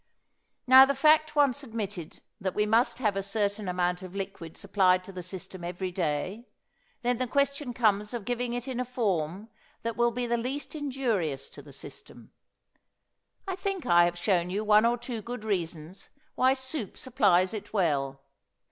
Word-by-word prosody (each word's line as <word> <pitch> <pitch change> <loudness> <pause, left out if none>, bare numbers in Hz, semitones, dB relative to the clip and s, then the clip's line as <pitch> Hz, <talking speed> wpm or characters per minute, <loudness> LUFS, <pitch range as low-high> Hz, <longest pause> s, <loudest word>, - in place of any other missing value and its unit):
Now, 260 +1 +10
the 280 +1 0
fact 310 +2 +4
once 285 -2 +3
admitted 205 - -6 0.2
that 190 -2 -3
we 210 - +2
must 230 +2 +2
have 215 -5 0
a 195 - 0
certain 205 0 -2
amount 180 0 0
of 185 0 -9
liquid 195 -4 -6
supplied 190 -2 +3
to 195 - -10
the 185 -1 -6
system 185 0 -8
every 180 +2 -4
day, 180 +5 -2 0.6
then 245 0 +1
the 255 - 0
question 280 0 0
comes 210 -3 +1
of 235 -5 -5
giving 245 0 -2
it 245 +1 -4
in 255 -2 -3
a - - +1
form 205 -5 -2 0.3
that 230 0 -2
will 240 0 +3
be 245 +1 -3
the 235 0 0
least 260 +5 -3
injurious 245 - -2
to - - -11
the - - -14
system. - - -11 1.2
I 380 - -2
think 385 -3 -3
I 175 -7 +6
have 175 0 -1
shown 175 -1 +1
you 200 +4 -1
one 215 +1 +5
or 240 +1 +1
two 240 -2 -5
good 240 +1 -6
reasons 175 -3 -4 0.2
why 260 +1 +3
soup 260 -4 -5
supplies 200 -8 +3
it 210 -2 -6
well. 140 -9 0
215 Hz, 175 wpm, -28 LUFS, 185-250 Hz, 1.2 s, Now